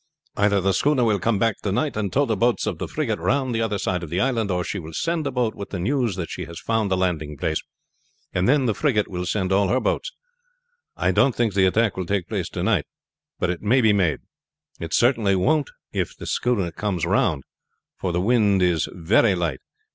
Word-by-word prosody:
"Either 100 0 +3
the 95 +1 +1
schooner 140 +1 +2
will 110 -3 +2
come 105 +4 +1
back 115 +1 +1
to 100 - -2
night 145 +9 0
and 105 -3 -2
tow 145 +2 +2
the 110 - 0
boats 120 +4 +1
of 100 -7 -3
the - - -3
frigate 125 -9 -2
round 130 -2 0
the 115 - 0
other 110 -2 0
side 90 -2 -1
of 85 - -7
the 85 +3 -1
island, 115 -2 0
or 90 -1 0
she 100 - -4
will 80 -1 -9
send 165 -3 -1
a - - -2
boat 125 -3 0
with 100 - -8
the 95 - -4
news 120 +2 0
that 85 -3 -5
she 90 - -5
has 85 0 -9
found 110 -3 -1
a - - +3
landing 80 -5 -1
place, 80 +2 -1 0.7
and 90 +1 +1
then 140 -1 +3
the 115 - +2
frigate 110 -5 +1
will 90 -1 -4
send 95 -1 -1
all 100 +1 +3
her 125 +7 +2
boats. - - -1 0.9
I - - +2
don't 135 - +3
think 115 -4 +1
the 95 -1 +4
attack 110 +2 +1
will 90 -2 -3
take 100 -3 -1
place - - -3
to - - -4
night; - - +1 0.5
but - - 0
it 90 - -5
may 115 +6 +3
be 110 -4 +4
made. 90 -7 +1 0.6
It 85 -1 -6
certainly 115 -1 +3
won't 145 +10 +1 0.2
if - - -2
the - - -8
schooner 105 -8 0
comes 95 -1 -2
round, 70 - +1 0.5
for 90 - -3
the 85 - 0
wind 100 -3 +3
is 85 -3 +1
very 95 +4 +3
light. 85 -6 -2
100 Hz, 230 wpm, -23 LUFS, 90-120 Hz, 0.9 s, the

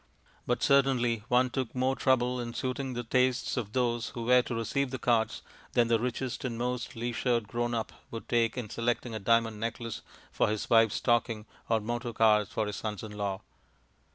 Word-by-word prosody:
But 120 - 0
certainly 130 -5 +3
one 125 +1 +3
took 130 -2 -3
more 130 +1 +1
trouble 125 -2 +2
in 120 -1 -5
suiting 130 0 -2
the 120 - -3
tastes 125 +1 +1
of 110 -4 -3
those 120 -2 0
who 120 - -6
were 125 +2 +5
to 120 - -5
receive 125 +4 -1
the 130 - -4
cards 115 -2 +1 0.3
than 120 -1 +3
the 115 -1 +3
richest 125 +1 -3
and 120 -3 -3
most 125 0 -3
leisured 120 -1 -1
grown 120 +2 -1
up 110 - -2 0.2
would 115 - -7
take 115 0 +1
in 120 -4 -3
selecting 120 +2 -2
a 110 - -3
diamond 115 +1 +2
necklace 115 0 -4 0.3
for - - +2
his 105 0 -2
wife's 115 -2 +5
stocking 115 -3 +1 0.2
or 115 -1 +3
motor 120 +2 -3
cars 105 -2 +4
for 110 - -1
his 105 -1 -4
sons 105 -2 -4
in 110 - -7
law. 100 -2 -3
120 Hz, 190 wpm, -30 LUFS, 115-125 Hz, 0.3 s, were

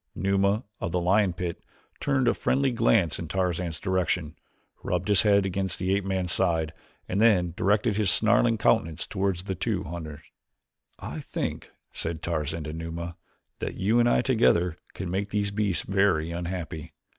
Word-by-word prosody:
Numa 100 +3 +1 0.2
of 90 - -3
the 90 - +1
lion 95 +2 +3
pit 85 -1 -5 0.4
turned 135 -3 +1
a - - +4
friendly 135 0 +1
glance 105 -8 +2
in 85 - -5
Tarzan's 90 -2 -1
direction, 90 -4 -1 0.5
rubbed 90 +2 -2
his 100 -3 +6
head 100 -2 +4
against 95 0 -2
the 95 +1 0
ape 100 - -1
man's 95 -2 -1
side, 80 -3 +1 0.3
and 95 +3 0
then 90 -7 +4
directed 105 +3 +1
his 105 -3 +2
snarling 115 +3 +4
countenance 85 -7 +1
toward 95 -1 -1
the 95 +1 -4
two 90 - -2
hunters. 80 -2 -7 0.8
"I - - -6
think," - - -4 0.2
said 80 0 -4
Tarzan 80 -1 -2
to 75 +1 -6
Numa, 85 +1 -5 0.4
"that - - -4
you 110 +5 +2
and 120 0 +4
I - - +3
together 90 -10 +2 0.2
can 95 -2 -4
make 100 +2 -1
these 100 -1 -1
beasts 100 -3 0
very 95 -5 +1
unhappy." 85 -2 -5
95 Hz, 165 wpm, -27 LUFS, 85-100 Hz, 0.8 s, his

